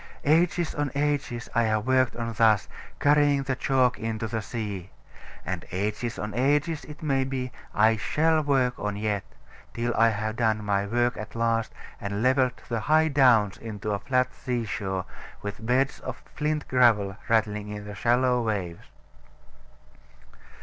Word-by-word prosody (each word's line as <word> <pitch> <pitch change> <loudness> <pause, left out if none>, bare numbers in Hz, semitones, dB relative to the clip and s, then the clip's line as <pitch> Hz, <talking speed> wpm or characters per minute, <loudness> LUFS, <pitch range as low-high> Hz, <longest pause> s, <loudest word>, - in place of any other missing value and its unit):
Ages 170 +2 +2
on 145 -1 -1
ages 140 -5 -1
I 115 - +3
have 110 -1 0
worked 130 -1 +2
on 115 -1 -3
thus, 110 -2 +3 0.3
carrying 145 -1 +4
the 135 -1 -1
chalk 130 -1 +2
into 115 -1 -3
the 110 0 -3
sea. 100 -5 -5 0.6
And 95 -3 -3
ages 105 +5 -2
on 105 0 -4
ages, 145 +5 +1
it 150 +2 -11
may 135 -3 +1
be, 130 -1 -3 0.2
I 110 +1 +4
shall 155 +9 +2
work 135 -4 +1
on 105 -1 -2
yet; 105 -2 -1 0.5
till 120 0 -1
I 115 +1 +4
have 110 +1 -3
done 110 -2 +1
my 100 -1 0
work 120 +2 +1
at 105 +1 -8
last, 115 -1 0 0.3
and 100 +2 -3
levelled 130 0 +2
the 115 -2 -1
high 155 +6 +3
downs 125 -8 +4
into 105 -2 -5
a 100 - -1
flat 130 +2 0
sea 120 -2 -3
shore, 95 -3 -3 0.4
with 100 +2 -6
beds 130 +4 +1
of - - -7
flint 150 0 -2
gravel 110 -6 +3
rattling 105 -2 +1
in 105 0 -6
the 105 - -7
shallow 125 +5 +2
waves. 100 -7 -3
115 Hz, 155 wpm, -26 LUFS, 105-135 Hz, 0.6 s, carrying